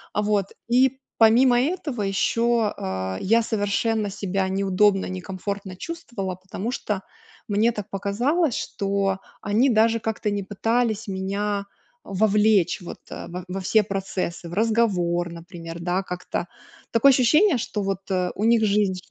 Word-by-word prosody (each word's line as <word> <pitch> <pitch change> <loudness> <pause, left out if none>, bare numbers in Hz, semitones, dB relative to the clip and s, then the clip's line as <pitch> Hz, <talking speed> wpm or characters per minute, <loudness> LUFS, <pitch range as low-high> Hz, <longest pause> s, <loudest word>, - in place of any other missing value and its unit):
Вот. 205 -1 +1 0.2
И 260 +2 +4 0.2
помимо 240 +2 +6
этого 290 - -2
ещё, 230 +3 +1
э, 95 0 -3
я 230 +4 +3
совершенно 215 0 0
себя 195 -1 -2
неудобно, 195 +1 +2
некомфортно 190 +1 -5
чувствовала, 230 - -5
потому 190 +5 -5
что 210 -6 -3 0.5
мне 215 +3 +3
так 210 -3 -6
показалось, 240 - 0
что 195 -2 -1 0.2
они 230 +7 +2
даже 225 0 +3
как-то 220 -1 -2
не 205 -1 -2
пытались 225 +2 0
меня 200 +1 -2 0.4
вовлечь, 210 -1 +2
вот, 175 - -8
во 180 +1 -7
во 185 +2 -4
все 215 +3 +3
процессы, 185 -3 -4
в - - -8
разговор, 190 -5 +1
например, 170 -1 -9
да, 180 +2 -1
как-то. 180 -1 -4 0.4
Такое 235 +4 +6
ощущение, 290 - +4
что 215 -2 -3
вот, 195 -1 -1
э, 180 -1 0
у 210 - -3
них 230 -1 +4
жизнь 200 -2 +1
205 Hz, 135 wpm, -24 LUFS, 190-230 Hz, 0.5 s, помимо